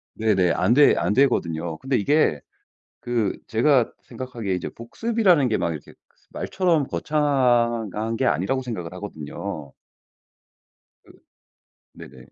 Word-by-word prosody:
네네. 100 -6 +2
안 95 +7 +2
되 145 +2 +6
안 - - +1
되거든요. 85 - +1
근데 135 - -1
이게 125 - +2 0.6
그 120 -4 -1
제가 125 +1 +3
생각하기에 120 -7 -5
이제 - - -4
복습이라는 180 - +1
게 110 - +1
막 85 - -1
이렇게 75 -3 -8 0.2
그 - - -37 0.2
말처럼 170 -7 0
거창한 120 -7 0
게 130 - -1
아니라고 100 - 0
생각을 90 -9 -6
하거든요. 75 -6 -7 1.3
그 - - -17 0.8
네네. - - -13
115 Hz, 270 characters per minute, -23 LUFS, 95-135 Hz, 1.3 s, 되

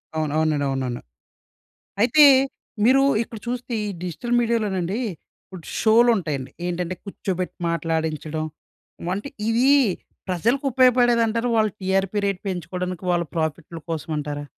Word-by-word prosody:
అవును. 155 -2 -1
అవునండి. 155 -2 +1
అవునండి. 130 -3 -3 1.0
అయితే 255 +7 +6 0.6
మీరు 260 +4 +5 0.2
ఇక్కడ 230 -1 -7
చూస్తే 245 0 -4
ఈ - - -3 0.2
డిజిటల్ 180 +8 -3
మీడియాలోనండి. 210 -4 0 0.4
ఇప్పుడు 185 -4 -12
షో‌లు 230 +2 +5
ఉంటాయండి. 145 -7 -4 0.2
ఏంటంటే, 180 +1 -2
కూర్చోబెట్టి 185 -2 -4
మాట్లాడించడం 160 -1 -2 0.7
అంటే, 205 +8 -5 0.2
ఇవి 240 +4 +3 0.6
ప్రజలకు 235 - 0
ఉపయోగపడేది 245 -2 +4
అంటారా? 230 +2 -1
వాళ్ళు 215 -1 +2
టీఆర్పీ 195 +1 0
రేట్ 195 -2 -1
పెంచుకోవడానికి 180 0 -4
వాళ్ళ 175 -1 +1
ప్రాఫిట్‌ల 160 +1 -3
కోసం 160 0 -4
అంటారా? 145 0 -4
185 Hz, 120 wpm, -23 LUFS, 160-230 Hz, 1.0 s, అయితే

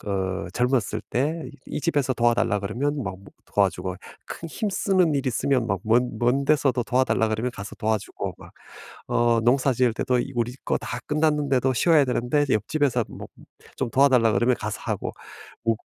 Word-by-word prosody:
그 95 -2 -2
젊었을 125 -4 0
때 155 +6 -1 0.2
이 - - -4
집에서 145 -6 +1
도와달라 120 -3 +2
그러면 135 +8 -2
막 100 -4 -4
뭐 100 - -18 0.3
도와주고, 90 0 +1 0.3
큰 165 - -7
힘쓰는 190 -4 +1
일 140 -1 -1
있으면 130 0 +1
막 95 -4 -1
먼 120 +2 +2
먼 125 +4 +2
데서도 135 -5 +2
도와달라 125 -3 +2
그러면 110 +3 -1
가서 100 -2 -8
도와주고 110 -2 -2
막 - - -14 0.6
어 120 -1 +2
농사 130 +3 +3
지을 125 0 +2
때도 125 +1 0
이 135 - -3
우리 120 +1 -1
거 - - +1
다 - - -5
끝났는데도 150 -4 +2
쉬어야 150 +3 +4
되는데 125 +3 +1
옆집에서 125 +2 +1
뭐 - - -9 0.5
좀 130 - -1
도와달라고 130 -5 +4
그러면 125 +1 +3
가서 105 -1 -4
어 - - -3
하고 - - -3 0.5
우 115 0 +3
125 Hz, 350 characters per minute, -24 LUFS, 115-140 Hz, 0.6 s, 쉬어야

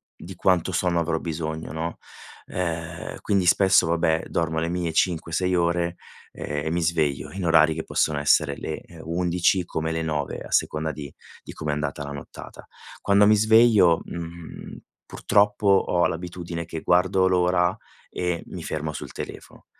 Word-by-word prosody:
di 90 +3 -10
quanto 90 0 +2
sonno 85 -1 +1
avrò 80 0 0
bisogno, 80 -1 -4
no? 80 +1 -4 0.5
Uhm, 85 -2 -4
quindi 100 -3 +1
spesso, 95 0 +4
vabbè, 80 -1 +1
dormo 80 -1 -1
le 85 +1 -1
mie 85 -1 -2
5-6 85 +2 0
ore, 85 0 0 0.4
ehm, 75 0 -4
e - - -1
mi 85 +1 0
sveglio 80 -5 0
in 95 -2 -5
orari 80 -1 +5
che 80 - -4
possono 75 -2 0
essere 75 0 +3
le - - -5 0.2
11:00 90 +2 +1
come 80 -1 -3
le 80 0 -2
9:00, 75 -3 -2
a - - -10
seconda 80 0 0
di 70 -2 -8 0.3
di - - -9
come 75 - -3
è - - 0
andata 75 0 -3
la 70 - -6
nottata. 70 -1 -10 0.4
Quando 100 +1 +4
mi 105 - +6
sveglio, 110 -5 +5
mhmm, 85 -1 -8 0.3
purtroppo, 105 0 +1
ho 95 -3 +3
l'abitudine 85 0 -5
che 80 0 -6
guardo 95 +1 +3
l'ora 90 0 +2 0.3
e 90 -2 -2
mi - - -8
fermo 80 0 -3
sul - - -7
telefono, - - -9
85 Hz, 160 wpm, -24 LUFS, 80-90 Hz, 0.5 s, mi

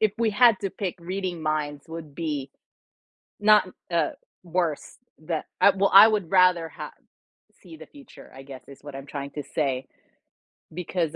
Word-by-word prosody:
if 215 -2 +2
we 230 -2 +2
had 230 0 +5
to 195 -2 -3
pick 195 -3 -4
reading 180 -1 -4
minds 150 -1 -2
would 160 -3 -9
be 150 -5 -4 0.9
not, 210 -2 +5 0.2
uh, 170 -1 +1 0.3
worse 170 -3 -2 0.2
that 155 0 -4 0.2
I, - - +8
well, 195 0 +1
I 200 +3 +11
would 210 -6 -1
rather 180 -3 +4
h - - -7 0.7
see 325 - -13
the - - -12
future, 285 -2 -16
I 135 - -11
guess 135 -2 -11
is 140 -1 -14
what 145 -2 -9
I'm 135 - -8
trying 140 -1 -6
to 145 - -6
say. 135 -2 -2 0.9
Because, 175 -2 -3
170 Hz, 165 wpm, -25 LUFS, 145-195 Hz, 0.9 s, I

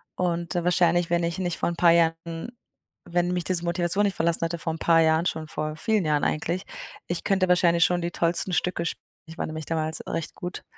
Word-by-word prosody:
Und, 170 -2 -2
äh, 175 - 0
wahrscheinlich, 175 -1 +3
wenn 175 0 +1
ich 170 +2 -2
nicht 175 -3 -2
vor - - 0
ein 170 - -4
paar 170 0 +5
Jahren 165 +2 0 0.6
wenn 175 +1 +1
mich 180 -1 -1
diese 175 -1 -1
Motivation 175 +4 +1
nicht 195 - -1
verlassen 165 0 +2
hätte, 170 +1 -3
vor 160 0 -2
ein - - -6
paar 165 -1 +4
Jahren, 160 +1 +3
schon 160 -3 -2
vor 155 0 -3
vielen 210 +2 0
Jahren 150 -1 +1
eigentlich. 170 +4 -1 0.4
Ich 175 0 -3
könnte 190 -2 +2
wahrscheinlich 170 -2 +4
schon 180 0 +1
die 170 - -2
tollsten 170 +2 0
Stücke 175 +1 0
sp - - -3 0.3
Ich 165 0 -12
war - - -2
nämlich 155 0 -6
damals 160 0 -2
recht 165 - -4
gut. 180 0 -6
170 Hz, 225 wpm, -25 LUFS, 165-175 Hz, 0.6 s, paar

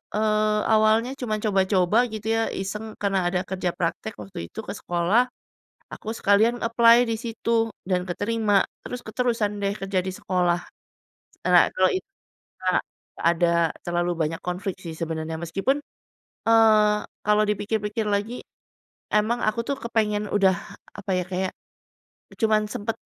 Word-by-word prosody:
eee, 215 0 +2
awalnya 220 +3 +4
cuman 215 -3 -1
coba-coba 190 -1 +2 0.2
gitu 215 0 -5
ya, 225 - +2
iseng, 200 +3 -4 0.2
karena 195 -1 +1
ada 180 +1 0
kerja 185 -1 -1
praktek 180 +5 -2
waktu 185 -2 -8
itu - - -9
ke - - -3
sekolah, 175 +7 +2 0.7
aku 215 - -9
sekalian 220 +4 +3
apply 230 +1 +6
di 230 - -1
situ 230 0 0 0.2
dan 180 -1 -1
keterima, 205 +1 +1 0.2
terus 245 0 -7
keterusan 220 -3 -1
deh 200 0 -1
kerja 195 -2 -1
di 190 - -5
sekolah. 180 -2 +1 0.9
Eee, - - +2
nah, - - +8
kalau - - +4
it 375 - -2 0.6
a 185 0 +2 0.4
gak - - -3
ada 170 0 +2 0.3
terlalu 175 0 -1
banyak 165 +2 -2
konflik 185 +2 -3
sih 170 -3 -7
sebenarnya, 160 0 -4
meskipun, 195 - 0 0.7
eee, 215 -2 +5 0.3
kalau 210 0 +4
dipikir-pikir 210 +1 -1
lagi, 205 +4 -1 0.8
emang 220 +3 +2
aku 215 +2 +1
tuh 280 - 0
kepengen 210 -3 0
udah 190 -3 +3 0.4
apa 195 - -6
ya, 180 - +1
kayak, 185 0 -1 0.9
cuman 215 -1 +3
sempat 210 +2 -3
210 Hz, 145 wpm, -24 LUFS, 185-220 Hz, 0.9 s, nah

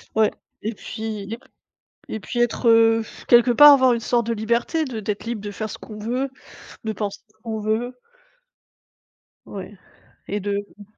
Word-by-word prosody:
Ouais 220 -1 +4 0.3
et 220 +2 -2
puis, 220 -1 -6
lib 225 +4 -6 0.7
et 220 - -4
puis 240 - -4
être, 240 0 +2
heu, 225 0 +5 0.3
quelque 240 0 +6
part 295 +4 +10
avoir 260 -2 +5
une 235 - +1
sorte 235 0 0
de 230 - +1
liberté, 235 +8 0
de 235 -5 -5
d'être 210 +1 -3
libre 230 -3 -3
de 205 - -5
faire 215 +1 -5
ce - - -7
qu'on 215 -1 -10
veut, 250 +5 -2 0.6
de 220 - -1
penser 205 -1 -4
ce 215 - -32
qu'on 220 -1 -3
veut. 225 +4 -1 1.5
Ouais, 195 0 -8 0.5
et 205 - -2
de 205 0 -2
mmh. 205 - -11
225 Hz, 175 wpm, -23 LUFS, 210-240 Hz, 1.5 s, part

